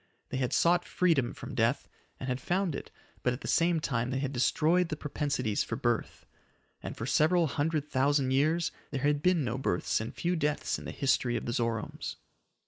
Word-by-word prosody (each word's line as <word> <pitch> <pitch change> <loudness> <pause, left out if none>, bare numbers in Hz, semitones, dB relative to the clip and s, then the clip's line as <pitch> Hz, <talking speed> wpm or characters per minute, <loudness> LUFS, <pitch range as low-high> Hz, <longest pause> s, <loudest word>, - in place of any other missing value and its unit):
They - - -3
had 130 -2 0
sought 175 +1 +3
freedom 160 -9 +2
from 135 +1 -8
death, 120 +2 +1 0.3
and 130 - -5
had 130 0 -2
found 180 +1 0
it, - - -6 0.3
but 125 - +1
at 125 - -7
the - - -6
same 170 -1 +3
time 125 -5 -1
they 130 - -1
had 135 0 -2
destroyed 165 +7 +2
the 155 - -2
propensities 140 -7 -1
for - - -4
birth. - - -1 0.6
And - - -6
for 115 - -4
several 165 +6 +3
hundred 150 0 -1
thousand 135 -1 +2
years 155 +5 +2 0.2
there 135 -2 -3
had 145 0 +2
been 180 -2 +3
no 125 +1 -2
births 100 -4 0
and 110 +2 -4
few 175 +5 -1
deaths 150 -2 -1
in - - -10
the - - -4
history 130 -3 +1
of - - -5
the 120 - -2
Zoromes. 115 -2 -2
140 Hz, 200 wpm, -30 LUFS, 125-160 Hz, 0.6 s, sought